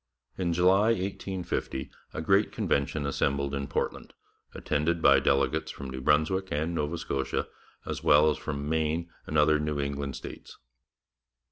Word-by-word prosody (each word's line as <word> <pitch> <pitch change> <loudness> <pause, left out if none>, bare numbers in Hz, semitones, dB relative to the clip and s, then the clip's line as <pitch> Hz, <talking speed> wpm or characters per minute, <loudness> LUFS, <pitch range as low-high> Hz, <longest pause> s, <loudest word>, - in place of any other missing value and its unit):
In 90 -2 -1
July 95 +5 +4
1850 95 -8 -3 0.2
a 80 - -5
great 95 +5 +3
convention 70 +1 0
assembled 70 0 0
in 70 0 -2
Portland, 70 - -3 0.4
attended 75 +3 0
by 70 -4 +6
delegates 70 +3 +1
from 70 -2 -7
New 65 0 -5
Brunswick 80 +8 +2
and 80 +4 -1
Nova 80 +1 -1
Scotia 70 -4 -2 0.4
as - - -4
well 75 +2 +6
as 75 - -4
from 70 -2 -4
Maine 80 +2 -1 0.2
and 75 - -1
other 75 0 +4
New 75 -1 -2
England 70 -1 -3
states. - - -9
75 Hz, 145 wpm, -28 LUFS, 70-85 Hz, 0.4 s, by